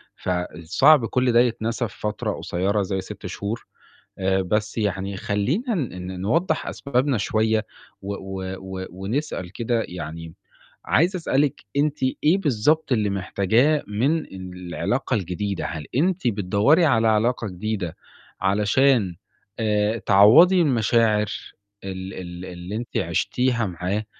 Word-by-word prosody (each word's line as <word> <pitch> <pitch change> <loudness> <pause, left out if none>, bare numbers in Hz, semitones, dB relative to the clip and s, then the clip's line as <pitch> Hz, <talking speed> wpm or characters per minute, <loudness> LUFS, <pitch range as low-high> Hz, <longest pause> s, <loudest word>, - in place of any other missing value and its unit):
فصعب 90 - +2
كُلّ 125 +1 +1
ده 120 - +5
يتنسى 115 0 0
في - - -16
فترة 105 0 -2
قصيّرة 100 +4 -1
زي 95 0 -2
6 95 - -10
شهور. 105 +4 -4 0.5
آآ، 95 0 +1
بس 105 +4 -1
يعني 100 -1 -1
خلّينا 135 - -1
ن 100 - -4
ن 95 0 -6
نوضّح 160 - 0
أسبابنا 135 -1 0
شوية 110 +1 +1 0.4
و 100 +1 -4
و 95 -1 -6
و 95 0 -6
ونسأل 95 - -4
كده 115 +2 -1
يعني، 80 -1 -7 0.5
عايز 175 +6 +2
أسألِك 145 -5 0
أنتِ 150 +1 +1 0.3
إيه 165 +6 +5
بالضبط 150 - +1
اللي 105 -4 +2
محتاجاه 110 +10 +2
من 140 +10 +1
العلاقة 90 +7 -3
الجديدة؟ 100 -1 -2
هل 80 -3 -6
أنتِ 175 -1 +1
بتدوّري 105 - +3
على 115 -7 +3
علاقة 110 +1 +1
جديدة 95 -2 -4 0.4
علشان 105 0 +2 0.4
آآ، 105 0 +1
تعوّضي 150 - +6
المشاعر 115 -5 +2 0.6
ال 95 0 -6
ال 90 -1 -7
اللي 90 +2 -7
أنتِ 120 +1 -5
عِشتيها 125 -3 0
معاه، 95 +4 -3
105 Hz, 125 wpm, -23 LUFS, 95-125 Hz, 0.6 s, تعوّضي